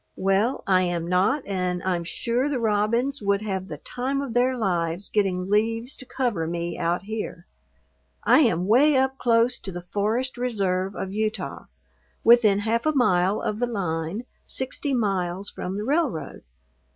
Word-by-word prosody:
Well, 195 +7 +1
I 185 -2 +4
am 175 -2 -1
not 190 +11 +2
and 180 -2 -2
I'm 180 -2 0
sure 235 +10 -1
the 285 - -1
robins 230 +5 +1
would 200 0 +1
have 190 -3 -3
the 150 - -6
time 260 - -3
of 275 -4 -4
their 250 +2 +2
lives 175 -3 -1
getting 185 -3 0
leaves 225 +5 0
to 260 - -7
cover 235 -13 -1
me 170 0 -3
out 170 +1 -1
here. 210 -4 -5 0.8
I - - +6
am 175 - +3
'way 270 +8 +5
up 265 0 +1
close 235 +1 +3
to 195 - -6
the 175 -1 -7
Forest 220 +7 -1
Reserve 195 -6 -1
of 190 0 -4
Utah, 215 +1 -3 0.6
within 225 -4 +6
half 230 +6 0
a 310 - +3
mile 190 -5 +2
of 215 - -2
the 245 - +1
line, 185 0 -3 0.2
sixty 265 +1 -2
miles 195 -3 -1
from 185 +2 -5
the 210 - -3
railroad. 280 - -1
210 Hz, 165 wpm, -25 LUFS, 185-245 Hz, 0.8 s, I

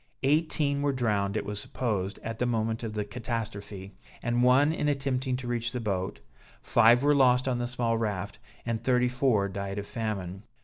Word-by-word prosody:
Eighteen 145 -1 +2
were 145 -1 +1
drowned, 105 -5 0
it - - -2
was 105 0 -4
supposed, 105 -4 -2
at 115 0 -5
the 125 - +1
moment 115 -1 -1
of 115 -2 -4
the 105 -1 -2
catastrophe, 100 -3 -5 0.3
and 120 +1 +1
one 130 +5 +5
in 150 - -1
attempting 135 -2 0
to 125 -1 -6
reach 115 -1 -2
the 125 - -2
boat, 95 -5 -3 0.4
five 120 +2 +5
were 145 +1 +5
lost 130 -2 +4
on 125 -2 0
the 120 - -1
small 120 -2 -1
raft, 105 -5 -3 0.3
and 115 -1 -2
thirty 125 -1 +3
four 125 -6 +2
died 100 0 -5
of 100 - -3
famine. 100 -5 -4
115 Hz, 185 wpm, -28 LUFS, 105-130 Hz, 0.4 s, one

